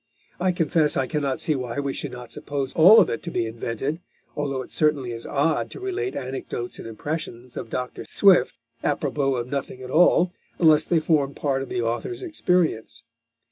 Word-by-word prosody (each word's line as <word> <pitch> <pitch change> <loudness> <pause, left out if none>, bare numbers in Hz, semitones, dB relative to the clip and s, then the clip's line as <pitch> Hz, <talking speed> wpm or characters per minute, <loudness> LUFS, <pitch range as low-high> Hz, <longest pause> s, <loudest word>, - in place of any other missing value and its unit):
I 185 +1 +2
confess 165 -3 +2
I 135 - +1
cannot 140 -2 -1
see 155 - +1
why 125 -2 -3
we 140 -1 -2
should - - -4
not 125 -1 -9
suppose 140 -2 -3
all 185 +8 +8
of - - +5
it 115 - -3
to 170 - -6
be 120 - -1
invented, 115 +7 -3 0.4
although 140 -3 -2
it - - -15
certainly 150 -5 +1
is 115 0 -6
odd 150 +3 +1
to - - -9
relate 385 +1 -3
anecdotes 125 -2 -5
and - - -7
impressions 125 0 -5
of - - -6
Dr. 125 +2 -4
Swift, 185 -10 +4 0.3
à 145 - +1
propos 135 -2 0
of 120 - -3
nothing 130 -1 -5
at 130 - -7
all, 175 +2 +4 0.2
unless 155 -2 +5
they 170 - +2
formed 150 -3 +1
part 135 -2 -1
of 135 - -6
the 120 - -1
author's 120 - -3
experience. 180 - 0
140 Hz, 190 wpm, -24 LUFS, 125-160 Hz, 0.4 s, all